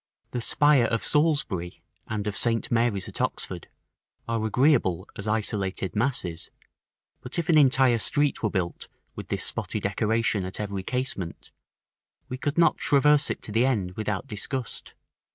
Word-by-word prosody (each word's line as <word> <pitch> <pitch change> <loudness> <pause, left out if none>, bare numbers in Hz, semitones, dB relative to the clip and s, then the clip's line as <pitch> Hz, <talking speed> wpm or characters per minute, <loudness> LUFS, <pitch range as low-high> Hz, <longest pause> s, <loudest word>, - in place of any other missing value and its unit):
The 120 - -3
spire 145 0 +4
of 115 0 -1
Salisbury, 135 - +1 0.2
and 105 -2 -3
of 105 -1 -3
St. 115 -1 +1
Mary's 115 -4 +1
at - - -6
Oxford, - - -3 0.6
are 115 -1 -1
agreeable 110 - +2
as 100 - -6
isolated 100 -3 -1
masses; 105 -8 -1 0.7
but 125 - -5
if 170 -1 -2
an 160 - +5
entire 130 -4 +4
street 145 +5 +1
were 110 - +1
built 90 -4 -3 0.3
with - - -8
this - - -1
spotty - - -1
decoration 110 -2 0
at 95 +2 -3
every 100 -2 -3
casement, 115 -6 -4 0.8
we 125 - -4
could 145 +3 -2
not 170 - +4
traverse 150 +1 +3
it - - -4
to - - -4
the 115 +4 +3
end 100 -9 -1
without 105 0 -3
disgust. 120 +3 -4
115 Hz, 150 wpm, -26 LUFS, 100-135 Hz, 0.8 s, an